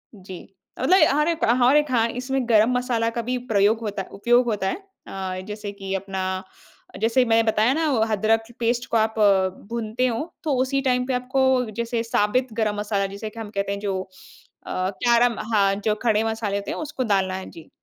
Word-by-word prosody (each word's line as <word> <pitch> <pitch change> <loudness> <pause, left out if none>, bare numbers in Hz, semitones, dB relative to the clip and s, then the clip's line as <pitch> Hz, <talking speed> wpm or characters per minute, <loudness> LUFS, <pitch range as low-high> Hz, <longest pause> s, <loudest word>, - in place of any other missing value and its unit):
जी। 185 -2 -10 0.4
मतलब 365 +9 +4 0.2
हर 300 +2 +2
एक 335 -1 -2 0.2
हर 270 +4 +6
एक 295 -3 +1
हाँ, 230 -2 +3
इसमें 255 +1 -2
गरम 220 +1 +5
मसाला 235 -2 0
का 235 - -3
भी 250 +2 -2
प्रयोग 205 +2 +3
होता 205 -3 -3
उपयोग 240 +4 +2
होता 205 -4 -1
है - - -3 0.3
अ, 185 -1 -5
जैसे 210 -1 -6
कि 195 -1 -6
अपना 190 -1 -3 0.6
जैसे 235 +3 +3
मैं 225 0 +3
बताया 220 +2 +3
ना 320 0 0
वो 240 - +1
अदरक 220 +2 +2 0.2
पेस्ट 240 +1 0
को 230 - +3
आप 220 0 0
अ, 195 -2 +4 0.2
भूनते 235 +2 -1
हो 235 +4 -1 0.2
तो 300 -3 0
उसी 275 +1 0
टाइम 250 -2 +1
पे 260 - -1
आपको 255 +2 0 0.3
जैसे 235 0 -1
साबित 230 +2 0
गरम 215 -2 0
मसाला 205 -1 -1
जिसे 215 +2 -6
कि 230 - -10
हम 215 -2 -6
कहते 200 -1 -2
हैं 200 - -3
जो 195 -2 -2 0.7
अ, 185 +1 -1
कैरम 235 0 +3
हाँ, 195 -1 +3
जो 210 +1 -1
खड़े 220 -2 +2
मसाले 220 -2 -2
होते 200 - -5
हैं, - - -4
उसको 295 -4 -4
डालना 190 -4 +1
है। 190 - -7
जी। 165 -2 -13
225 Hz, 200 wpm, -23 LUFS, 200-250 Hz, 0.7 s, हर